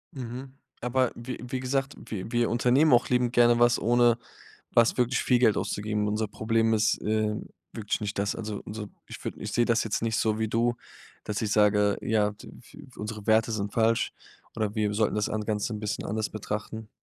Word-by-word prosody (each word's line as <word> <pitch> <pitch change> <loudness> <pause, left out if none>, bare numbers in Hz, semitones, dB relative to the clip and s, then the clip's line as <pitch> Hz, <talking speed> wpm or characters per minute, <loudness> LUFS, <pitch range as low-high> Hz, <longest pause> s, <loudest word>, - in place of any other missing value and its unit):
Mhm, 130 +1 -7 0.3
aber 125 +1 +1
wie 120 +2 -6
wie 130 +1 -4
gesagt, 135 +2 -1
wir 110 +2 -6
wir 120 -1 +2
unternehmen 125 +5 +4
auch 120 - +4
liebend 125 -1 +1
gerne 120 -1 +5
was, 120 0 +4
ohne 120 0 +4 0.6
was 115 -1 +4
wirklich 125 0 +1
viel 125 - +3
Geld 115 -4 +4
auszugeben. 105 0 -1
Unser 105 0 -1
Problem 115 +1 +1
ist, 110 0 +2
ähm, 110 0 -1 0.2
wirklich 105 -2 -3
nicht 105 -1 -4
das. 100 +1 0
Also, 105 -2 -5
unser 105 0 -6 0.2
ich - - -10
würd - - -3
ich - - -5
sehe 120 - +3
das 115 -1 +2
jetzt 110 - -2
nicht 115 0 0
so 110 -1 +1
wie 110 -1 0
du, 120 +2 +1 0.5
dass 105 +1 -3
ich 105 - -1
sage: 105 -1 +3
„Ja, 105 -1 +1
d 105 - -13
w 145 +4 -14
unsere 105 0 -6
Werte 110 +1 +3
sind 100 -2 -3
falsch 115 0 +2 0.4
oder 110 -2 -1
wir 105 -1 0
sollten 110 -1 +1
das 105 -1 0
an 110 0 -2
Ganze 105 +1 -1
'n 105 - -5
bisschen 105 -1 -3
anders 110 +1 -2
betrachten.” 110 +1 -5
110 Hz, 200 wpm, -27 LUFS, 105-120 Hz, 0.6 s, gerne